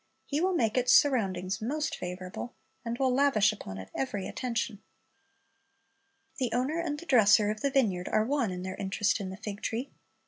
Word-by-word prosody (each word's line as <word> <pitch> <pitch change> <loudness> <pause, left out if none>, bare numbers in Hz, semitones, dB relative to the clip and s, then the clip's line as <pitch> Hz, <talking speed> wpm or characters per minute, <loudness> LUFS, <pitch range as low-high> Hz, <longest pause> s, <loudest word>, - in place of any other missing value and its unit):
He 295 +2 -1
will 370 0 +2
make 230 -4 +2
its 250 - +2
surroundings 195 -7 +2
most 295 +7 -2
favorable, 180 +6 -6 0.3
and 235 0 -3
will 260 -1 +2
lavish 250 -6 +4
upon 95 - -8
it 95 0 -9
every 205 -8 -3
attention. 230 -4 -3 1.6
The 255 -2 0
owner 265 +7 0
and 315 -3 -2
the 340 - -10
dresser 215 -6 +5
of 215 - -6
the 280 - +2
vineyard 215 -10 +1
are 215 - +2
one 265 -3 0
in 180 0 -5
their 185 0 -4
interest 200 +3 0
in 195 -2 -4
the 190 - -7
fig 205 -1 -6
tree. 240 +5 -3
225 Hz, 180 wpm, -29 LUFS, 195-270 Hz, 1.6 s, dresser